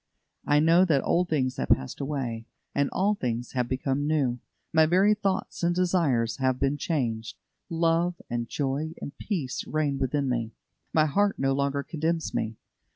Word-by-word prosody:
I 145 0 +5
know 165 +4 +5
that 150 -6 +2
old 180 +1 +1
things 130 -5 0
have - - -2
passed 65 - +1
away, 130 -6 -3 0.3
and 140 0 +1
all 200 +3 +1
things 120 - -3
have 125 -2 -1
become 135 +2 -1
new. 135 -6 +1 0.3
My 160 -1 +5
very 190 +5 +4
thoughts 200 -2 -2
and 175 0 +2
desires 165 -11 +1
have 130 -1 +1
been 140 +1 +1
changed. 120 -7 -2 0.3
Love 165 +1 +1
and 120 -1 -3
joy 145 +3 -2
and 140 - -7
peace 155 - -3
reign 150 -3 0
within 140 +1 0
me. 115 -3 -1 0.4
My 155 -1 +4
heart 200 +7 +1
no 135 0 +1
longer 140 +1 0
condemns 165 +1 -2
me. 110 0 -2
145 Hz, 165 wpm, -27 LUFS, 130-165 Hz, 0.4 s, I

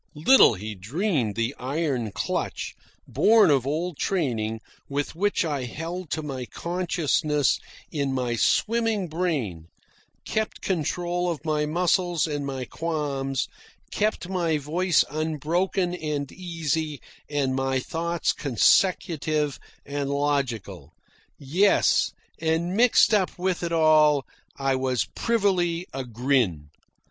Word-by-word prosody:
Little 155 - +6
he 105 +3 -6
dreamed 125 - -1
the 115 +3 -1
iron 130 -4 -1
clutch, - - -3 0.3
born 215 -6 +5
of 135 -2 +2
old 160 +2 -2
training, 115 - -1 0.3
with 140 +1 -2
which 200 0 +1
I 145 -5 -2
held 165 +6 -6
to 155 -1 -2
my 135 -4 -4
consciousness 165 -5 0 0.3
in 140 -3 -1
my 125 -2 -1
swimming 225 - +1
brain, 140 - -2 0.6
kept 220 0 -2
control 175 0 -1
of 165 -2 -4
my 150 -1 0
muscles 175 +1 +1
and 145 -3 -3
my 135 -2 -4
qualms, 140 -5 -2 0.4
kept 210 -3 -1
my 175 -4 0
voice 165 +4 +2
unbroken 160 +4 -1
and 150 -5 -3
easy 160 -4 -3 0.3
and 140 -3 0
my 135 0 0
thoughts 170 +5 -1
consecutive 150 - +2 0.3
and 140 0 -3
logical. 130 - -2 0.4
Yes, 175 +9 +3 0.3
and 165 +3 0
mixed 235 0 +5
up 195 -3 +1
with 180 0 -1
it 170 -1 -2
all 155 -4 +4 0.3
I 135 -1 +1
was 130 -2 0
privily 185 -7 +1
a 135 0 -3
grin. 120 - 0
155 Hz, 115 wpm, -25 LUFS, 135-175 Hz, 0.6 s, Little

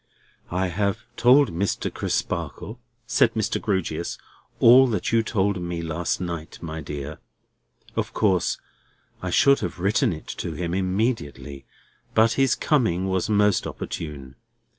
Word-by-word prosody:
"I 90 +1 0
have 100 +5 -1
told 130 +5 +5
Mr. 95 +4 -1
Crisparkle," 110 +4 -3 0.3
said 120 -3 +2
Mr. 110 -2 -1
Grewgious, 95 -5 -2 0.4
"all 130 +3 +8
that 105 -7 -1
you 115 0 +4
told 100 -3 0
me 85 -1 -4
last 85 +1 -2
night, 85 -2 -5
my 80 -1 -6
dear. 75 0 -6 0.8
Of - - -2
course 95 -5 +1 0.6
I 90 - -3
should 140 +10 +5
have - - -4
written 100 +2 +2
it 80 -2 -7
to 85 - -4
him 85 +2 -3
immediately; 95 - -2 0.5
but 110 +1 +5
his 135 0 +2
coming 95 - +1
was 95 +1 0
most 105 -2 +3
opportune. 70 -5 -7
95 Hz, 135 wpm, -24 LUFS, 85-110 Hz, 0.8 s, all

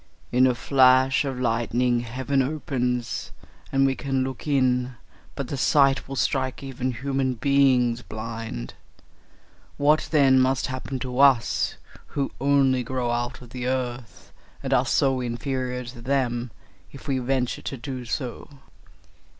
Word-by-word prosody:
In 125 +1 +5
a 125 - +1
flash 130 +1 +4
of 135 -2 -3
lightning 120 +1 +1
heaven 130 +3 -1
opens, 125 -4 -2 0.4
and 135 0 +3
we 135 - +2
can 135 -1 -1
look 130 +2 -6
in; 130 -3 +1 0.4
but 140 -3 -4
the 140 - -3
sight 135 0 +3
will 135 - -5
strike 130 0 -1
even 130 -1 -3
human 135 +1 -1
beings 125 -2 +3
blind. 110 - -6 1.0
What 150 +2 +3
then 135 -4 +5
must 130 +1 +2
happen 130 0 -4
to 125 -1 -4
us, 135 -4 +3 0.4
who 140 -1 0
only 135 -2 +3
grow 125 -1 -2
out 120 +2 -3
of 120 - -14
the 125 0 -4
earth, 125 -2 -4 0.3
and - - -1
are - - +3
so 135 -2 +2
inferior 125 +1 -3
to 120 0 -10
them, 125 -2 -1 0.4
if 140 - -12
we 135 -2 0
venture 125 0 -1
to 135 - -5
do 130 0 -6
so?" 125 +1 -4
130 Hz, 140 wpm, -25 LUFS, 125-135 Hz, 1.0 s, In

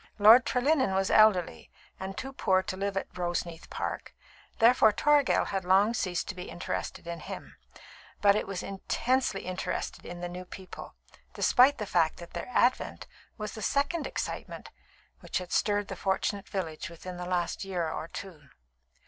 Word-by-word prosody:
Lord 220 +5 +8
Trelinnen 260 -5 +2
was 190 0 +1
elderly, 190 - +4 0.3
and 190 0 -6
too 270 +7 -5
poor 190 -7 +2
to 185 - -4
live 195 0 -2
at - - -4
Roseneath 175 -2 -3
Park, - - -5 0.4
therefore 230 -1 +6
Toragel 290 +4 +3
had 195 -1 -2
long 195 +5 +4
ceased 185 -6 -1
to - - -2
be 180 -1 -8
interested 175 - -4
in 170 0 -5
him; - - -8 0.6
but 200 -1 +5
it 210 - -1
was 195 -2 -4
intensely 220 +3 -1
interested 185 0 -4
in 175 - -8
the 175 - -3
new 180 +1 -7
people, 185 +1 -10 0.4
despite 265 +3 +5
the 210 - -3
fact 165 -4 +1
that 170 - -11
their 170 - -5
advent 250 0 +1 0.3
was 210 -2 -4
the 220 - -7
second 285 - 0
excitement - - -5 0.5
which - - -3
had 180 -1 -5
stirred 205 -1 +1
the - - -5
fortunate 195 +1 -1
village 165 -6 -4
within 175 +2 -8
the 180 - -5
last 180 0 -1
year 180 -4 -2
or 160 - -4
two. 165 -7 -9
195 Hz, 165 wpm, -29 LUFS, 180-220 Hz, 0.6 s, Lord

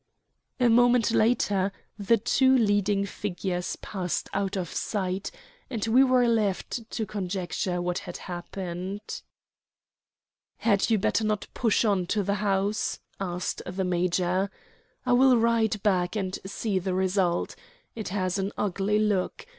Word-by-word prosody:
A 245 - +4
moment 240 -1 +4
later 205 -4 +2 0.2
the 210 +2 +2
two 260 +4 +3
leading 205 -3 +2
figures 185 -2 -3
passed 185 -4 -3
out 195 0 -1
of 180 -2 -2
sight, 190 -2 -2 0.4
and 230 -5 -2
we 240 +4 +5
were 255 -2 +4
left 225 +1 -1
to 220 - -2
conjecture 185 -2 -2
what 175 0 -1
had 175 - -7
happened. 185 +3 -6 1.4
"Had 205 -1 +2
you 225 - +4
better 215 +3 +1
not 215 -1 0
push 230 -1 +2
on 195 -4 +1
to 205 +2 0
the 200 +1 0
house?" 200 +1 0 0.2
asked 180 -2 -3
the 185 +1 -2
major. 180 +1 +1 0.6
"I 250 - +3
will 255 0 +6
ride 225 -2 +2
back 185 -2 +1
and 190 -3 -2
see 200 0 -1
the 185 0 -2
result. 185 -2 +1 0.4
It 220 -2 -5
has 185 0 -1
an 195 +1 -1
ugly 200 +1 0
look. 210 - 0
200 Hz, 140 wpm, -27 LUFS, 185-220 Hz, 1.4 s, will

